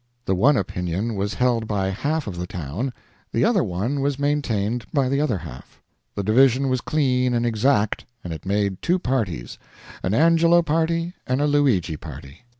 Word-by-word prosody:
The 95 - +1
one 130 +10 +4
opinion 95 +4 -2
was 100 0 -2
held 120 -3 +1
by 100 -3 0
half 145 +10 -1
of 100 - -5
the 90 - -4
town, 90 - -4 0.4
the - - +2
other - - +3
one 105 +11 -2
was 140 -1 0
maintained 125 -6 0
by 140 -4 +2
the 140 +2 +1
other 130 -9 +1
half. 65 -6 -11 0.4
The 100 - -2
division 130 +5 +4
was 130 -1 0
clean 125 -5 +1
and 120 0 +1
exact, 110 -1 +1 0.2
and 85 - -5
it 80 - -8
made 100 -1 -1
two 175 +2 +2
parties, 110 - -2 0.4
an 95 +3 0
Angelo 165 +3 +5
party 165 +2 0
and 130 +1 0
a 145 - +2
Luigi 130 - +2
party. 75 - -11
120 Hz, 175 wpm, -23 LUFS, 95-140 Hz, 0.4 s, Angelo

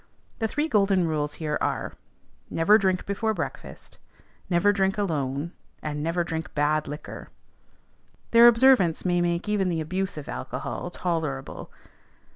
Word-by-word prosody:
The 225 - +1
three 295 +7 -1
golden 195 - +3
rules 150 -2 -2
here 150 -2 -2
are, - - -2 0.6
Never 205 +7 +4
drink 190 -2 0
before 220 +2 -1
breakfast; - - -7 0.5
never 185 +3 +3
drink 195 0 +1
alone; 150 -5 -2 0.3
and 150 -1 -3
never 165 +3 0
drink 165 0 -5
bad 150 +1 +1
liquor. 150 +1 -8 1.0
Their 235 +1 +8
observance 235 -9 +5
may 175 -1 +2
make 175 +2 -1
even 205 -3 +1
the 165 -2 -1
abuse 185 +3 -3
of 150 - -7
alcohol 65 - -5
tolerable. 160 -7 -3
175 Hz, 135 wpm, -26 LUFS, 155-200 Hz, 1.0 s, Their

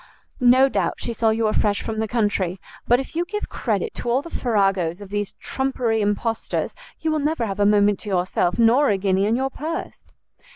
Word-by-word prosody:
no 255 +2 +6
doubt - - -1
she 235 - -3
saw 225 0 +2
you 220 +1 0
were 215 - +2
fresh 205 -1 +1
from 220 -1 -3
the 220 - 0
country! 205 -5 0 0.3
But 245 +1 +5
if 270 - -7
you 340 - +1
give 420 +4 -5
credit 455 -2 -2
to 240 - -4
all 255 +4 +1
the 335 - -10
farragos 195 -7 0
of 200 -2 -10
these 205 -1 -2
trumpery 250 -4 -1
impostors, 210 +2 -1 0.3
you 320 - 0
will 310 - +1
never 295 -4 0
have 200 -1 -4
a 205 - +4
moment 205 -1 +3
to 210 - -7
yourself, 180 -1 0
nor 240 +5 +4
a 200 - +2
guinea 195 0 +1
in 225 - +2
your 265 +2 -1
purse." 320 +5 -5
225 Hz, 210 wpm, -22 LUFS, 205-265 Hz, 0.3 s, no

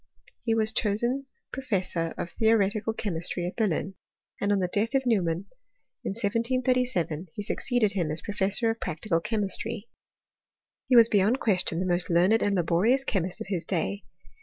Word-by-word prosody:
He 225 -2 0
was 220 0 +1
chosen 240 +7 0 0.3
professor 185 -10 -1
of 170 - -4
theoretical 220 -1 +2
che 220 -2 -3
mistry 170 +1 -2
at 180 - -4
Berlin; 195 -3 -1 0.5
and 205 - +1
on 205 - +3
the 185 -2 0
death 215 +8 -1
of 265 -1 +2
Neumann, 185 -6 +1 0.6
in - - -2
1737, 230 - 0
he 205 - -4
succeeded 235 0 +1
him 180 -6 -1
as 155 +2 -2
professor 205 +2 +1
of 225 - -6
practical 165 +2 -1
che 220 +4 -2
taistry. 205 +2 -1 1.0
He 255 - +3
was 230 -1 +9
beyond 210 +4 +2
question 180 -5 +1
the 185 - -1
most 175 -1 0
learned 180 +6 +4
arid 205 -1 +1
laborious 185 +10 +2
chemist 185 -8 -2
of - - -5
his 180 -5 -2
day. 200 +2 -2
205 Hz, 165 wpm, -27 LUFS, 180-230 Hz, 1.0 s, was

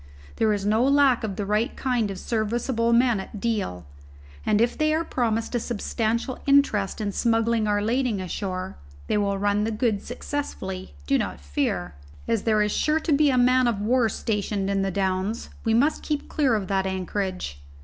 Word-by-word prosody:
There 220 -1 +3
is 200 -1 -1
no 215 +3 +3
lack 275 -3 +4
of 205 -3 -3
the 205 - -3
right 210 +3 0
kind 245 -5 0
of 195 - -5
serviceable 230 +2 0
men 235 -2 +4
at 200 +2 -7
Deal, 195 - -2 0.6
and 205 - +2
if 235 +1 +2
they 310 0 +2
are 325 - 0
promised 230 -4 -1
a 240 - +1
substantial 235 +2 -2
interest 275 -9 +3
in 205 -2 -1
smuggling 230 0 +1
our 205 0 +1
lading 240 -1 0
ashore, 185 0 -4 0.3
they - - 0
will 200 -1 0
run 205 +1 +1
the 220 - 0
goods 220 -2 0
successfully, 210 - -5
do - - +2
not - - -3
fear. 75 +5 -2 0.3
As 225 -3 +1
there 215 -2 +3
is 210 - 0
sure 305 +7 +1
to 315 -1 0
be 295 +1 +4
a 255 - +2
man 250 0 +4
of 230 -4 0
war 230 +2 +2
stationed 205 -2 -2
in 195 0 +1
the 195 - 0
Downs, 190 +3 -2
we 225 0 +2
must 285 +7 +2
keep 300 -2 -3
clear 270 -6 +2
of 205 -3 -1
that 195 0 0
anchorage. 185 - -3
220 Hz, 190 wpm, -25 LUFS, 195-245 Hz, 0.6 s, lack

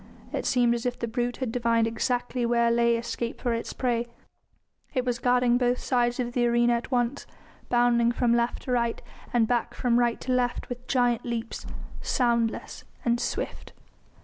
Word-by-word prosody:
It - - -2
seemed 240 -1 +3
as 235 +1 -2
if 245 - -2
the 235 - -3
brute 240 +1 -2
had 260 -4 -2
divined 230 -1 +2
exactly 245 +2 -1
where 235 0 +3
lay 235 0 +3
escape 235 0 -4
for 240 -2 0
its 230 - -3
prey. 240 -2 -1 0.9
It 255 -1 +1
was 245 -1 -1
guarding 245 0 +3
both 245 0 +2
sides 245 -1 0
of 240 -1 -2
the 240 -1 +2
arena 240 0 +3
at 235 0 -2
once, 245 +1 -1 0.4
bounding 240 -1 +3
from 240 -1 +2
left 235 0 0
to 255 - -4
right, 235 -2 +1 0.3
and 235 -2 +3
back 240 -1 0
from 245 -2 +2
right 240 -1 +1
to 255 - -3
left 250 -1 0
with 245 0 -7
giant 245 -3 +2
leaps, 235 -2 -4 0.3
soundless 235 -3 0 0.2
and 235 0 +2
swift. - - -4
240 Hz, 175 wpm, -27 LUFS, 235-245 Hz, 0.9 s, seemed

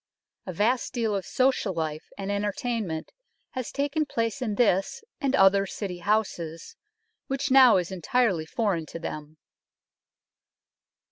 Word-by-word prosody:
A - - -2
vast 230 +8 0
deal 225 -3 0
of 195 - -3
social 255 -7 +1
life 155 -2 -3
and 200 0 -3
entertainment 205 - -2 0.4
has 255 -2 -4
taken 290 +2 -1
place 230 +2 -2
in 220 -5 -1
this 200 - +1 0.2
and 275 -1 +1
other 195 -1 +5
City 185 -4 -5
houses, 175 -5 -2 0.5
which 275 +1 -2
now 260 -5 +8
is 180 0 -2
en 185 -2 -6
tirely 195 -6 +1
foreign 185 -6 -1
to - - -7
them. 155 -2 -7
205 Hz, 135 wpm, -26 LUFS, 175-245 Hz, 0.5 s, now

